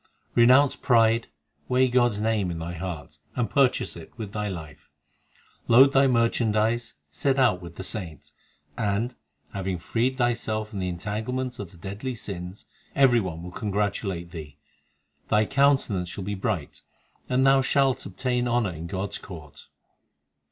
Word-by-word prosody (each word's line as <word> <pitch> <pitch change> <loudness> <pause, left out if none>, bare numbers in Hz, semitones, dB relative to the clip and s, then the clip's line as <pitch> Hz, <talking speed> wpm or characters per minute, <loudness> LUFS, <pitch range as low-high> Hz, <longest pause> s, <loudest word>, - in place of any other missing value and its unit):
Renounce 130 +4 +6
pride, 115 -1 +3 0.4
weigh 130 +1 +3
God 120 -2 +3
s - - -4
name 110 -3 +1
in 85 - -4
thy 85 +1 -5
heart, 80 -4 -6 0.2
And 120 -2 0
purchase 135 -3 +2
it 85 -2 -11
with 110 -4 -6
thy 105 -1 -2
life. 80 -6 -9 0.8
Load 135 +4 +7
thy 135 0 +5
merchandise, 115 -1 +1 0.2
set 135 - 0
out 110 -9 +3
with 85 -1 -10
the 95 - -6
saints, 90 - -7 0.4
And, 105 +6 -1 0.4
having 95 -2 -2
freed 120 +9 -1
thyself 115 -3 0
from 105 -3 -6
the 90 -1 -1
entanglements 110 +8 -3
of 100 -4 -6
the 85 - -17
deadly 100 +8 -5
sins, 95 -3 -7 0.3
Every 130 -4 +5
one 85 -5 -4
will 90 - -7
congratulate 100 -3 -2
thee; 75 -5 -9 0.7
Thy 105 +1 +3
countenance 135 -10 +2
shall 95 +3 -6
be 100 +2 -3
bright, 95 -6 -3 0.5
and 130 +1 +3
thou 135 0 +6
shalt 135 0 +2
obtain 125 +5 -1
honour 120 -5 +1
in 85 0 -7
God 95 +3 -3
s - - -6
court. 80 -7 -11
105 Hz, 155 wpm, -26 LUFS, 90-125 Hz, 0.8 s, Load